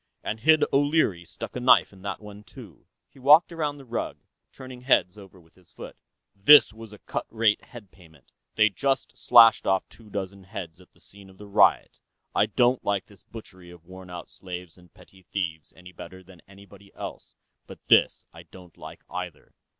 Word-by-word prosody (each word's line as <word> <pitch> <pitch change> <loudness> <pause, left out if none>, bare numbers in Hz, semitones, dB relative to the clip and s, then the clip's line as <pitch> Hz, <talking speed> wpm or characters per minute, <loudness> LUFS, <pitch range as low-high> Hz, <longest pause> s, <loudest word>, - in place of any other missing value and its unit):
And 110 - -4
Hid 155 +6 +4
O'Leary 140 - +1
stuck - - -9
a - - -3
knife 125 -4 +4
in 95 - -17
that 100 - -5
one." 105 -1 -13 0.6
He - - -21
walked 150 +7 +5
around 150 -3 -3
the 135 - -14
rug, 120 -1 -5 0.3
turning 130 -2 -12
heads 100 -8 +2
over 95 -2 -15
with 80 -1 -25
his 90 -2 -22
foot. - - -11 0.4
"This 110 +4 +6
was 110 -1 -12
cut - - -5
rate 110 -2 +1
head 110 -6 -14
payment; 80 -8 -22 0.2
they 110 0 +4
just 135 +7 -2
slashed 115 -1 +5
off 95 0 0
two 115 -2 -18
dozen 100 -1 -7
heads 90 -3 -9
at 90 - -22
the - - -28
scene 100 -1 -17
of 95 - -19
the 105 - -12
riot. 100 - +2 0.3
I - - +2
don't 125 +1 +1
like 100 -1 -2
this 100 -4 -20
butchery 95 -5 -13
of 85 -1 -16
worn 95 0 -13
out 90 -1 -10
slaves 90 -2 -10
and 90 -2 -21
petty 95 - -20
thieves 85 -4 -5
any 90 0 -15
better 95 +1 -12
than 90 -2 -18
anybody 100 0 -17
else, - - -9 0.3
but - - -11
this - - +3
I - - -12
don't 90 -3 -17
like - - -12
either. 90 -4 -8
100 Hz, 190 wpm, -25 LUFS, 90-115 Hz, 0.6 s, This